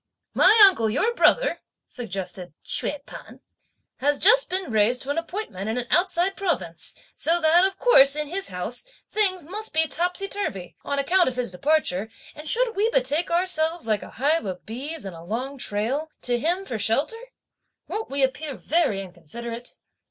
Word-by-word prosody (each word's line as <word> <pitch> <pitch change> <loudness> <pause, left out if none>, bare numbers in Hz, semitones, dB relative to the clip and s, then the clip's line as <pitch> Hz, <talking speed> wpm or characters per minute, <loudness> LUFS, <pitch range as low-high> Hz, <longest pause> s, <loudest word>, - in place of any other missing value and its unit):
"My 440 - +5
uncle, 230 - +2
your 450 - +1
brother," - - +3 0.3
suggested 185 - -6
Hsüeh 290 -1 -2
P'an, - - -12 0.6
"has 290 +2 +1
just - - +5
been 370 -5 -2
raised 220 +3 +2
to 275 - -3
an 310 - 0
appointment 330 - -6
in 225 - -2
an 245 - -2
outside 370 +1 +2
province, 240 - -3 0.2
so 335 +5 +2
that, 330 +2 +4
of 385 0 -2
course, 280 - +6
in 300 0 -2
his 385 +5 -2
house, 185 +7 -3 0.3
things 375 -6 0
must 415 +1 -6
be 320 0 +4
topsy 355 +5 -1
turvey, 205 - -4
on 280 - -3
account 355 +6 +3
of 255 - -8
his 250 -5 -2
departure; 220 - 0 0.2
and 300 0 -8
should 480 -1 +1
we 420 +3 +2
betake 295 - +1
ourselves, 340 -1 +2
like 215 -3 0
a - - -10
hive 295 +6 0
of 185 -2 -6
bees 275 +5 -6
and 190 -3 -7
a 165 - -11
long 250 +10 -5
trail, 245 +9 -1
to 245 -1 +1
him 350 +8 -1
for 230 - -4
shelter; 280 - 0 0.7
won't 440 +1 -4
we 275 0 0
appear 265 +2 -2
very 305 - 0
inconsiderate?" 230 +7 -8
290 Hz, 175 wpm, -24 LUFS, 225-360 Hz, 0.7 s, course